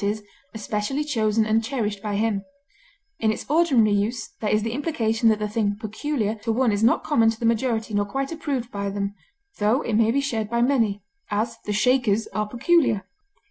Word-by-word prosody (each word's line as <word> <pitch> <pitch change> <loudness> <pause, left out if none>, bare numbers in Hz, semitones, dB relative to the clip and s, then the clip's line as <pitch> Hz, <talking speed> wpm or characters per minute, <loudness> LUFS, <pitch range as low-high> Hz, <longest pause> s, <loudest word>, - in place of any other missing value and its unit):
e._, 210 +2 -1 0.3
especially 215 +6 -2
chosen 220 -6 +1
and 220 +1 +2
cherished 215 -5 -2
by 210 -1 -3
him; 205 -2 0 0.8
in 220 -1 +2
its 220 - -5
ordinary 285 -9 +4
use 205 +4 -1
there 215 - 0
is 215 0 +2
the 225 - -2
implication 230 -5 +1
that 215 - +3
the 210 0 -2
thing 205 -1 -1
peculiar 220 +1 -2
to 225 +1 -3
one 240 0 +2
is 205 +1 0
not 230 - +3
common 230 -7 +3
to 225 0 -3
the 235 - -2
majority 230 -1 0
nor 205 0 +2
quite 270 +8 -3
approved 285 -7 -3
by 200 0 -3
them, 200 0 -3 0.5
though 215 +7 +2
it 235 - -3
may 220 +1 +4
be 260 +5 +2
shared 225 -6 -2
by 235 +1 0
many; 230 -6 +1 0.3
as, 225 +3 -2
the 210 - -2
Shakers 225 -1 +2
are 210 0 -2
peculiar. 240 - +2
225 Hz, 195 wpm, -24 LUFS, 210-245 Hz, 0.8 s, ordinary